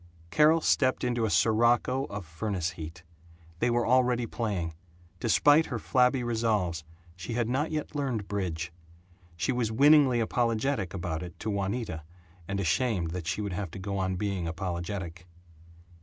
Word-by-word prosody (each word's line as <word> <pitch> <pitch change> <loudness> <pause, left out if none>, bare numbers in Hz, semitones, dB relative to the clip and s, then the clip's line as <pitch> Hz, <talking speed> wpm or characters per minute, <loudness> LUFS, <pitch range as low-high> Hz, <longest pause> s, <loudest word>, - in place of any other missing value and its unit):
Carol 155 +2 +5
stepped 130 -3 +2
into 120 -2 +1
a - - 0
sirocco 120 - +3
of 105 -6 -7
furnace 85 +1 -3
heat. 80 0 -9 0.6
They 120 - +2
were 120 -1 +1
already 125 0 +3
playing. 100 -9 -3 0.5
Despite 145 +7 +4
her - - -3
flabby 125 0 +2
resolves 110 -8 0 0.3
she 90 +6 -6
had 120 -1 0
not 135 +6 0
yet 155 -2 -4
learned 125 -8 -2
bridge. 90 -4 -3 0.6
She 85 - 0
was 120 -3 -1
winningly 140 0 +5
apologetic 115 -2 0
about 85 -3 -3
it 90 -1 -8
to 110 - -2
Juanita, 100 -3 -2 0.5
and 100 0 -2
ashamed 95 -2 0
that 85 -2 -5
she 95 +4 -1
should 100 -2 -3
have 95 0 -3
to 80 - -9
go 100 +1 -3
on 95 0 0
being 95 -3 -2
apologetic. 90 0 -4
105 Hz, 155 wpm, -28 LUFS, 90-125 Hz, 0.6 s, Carol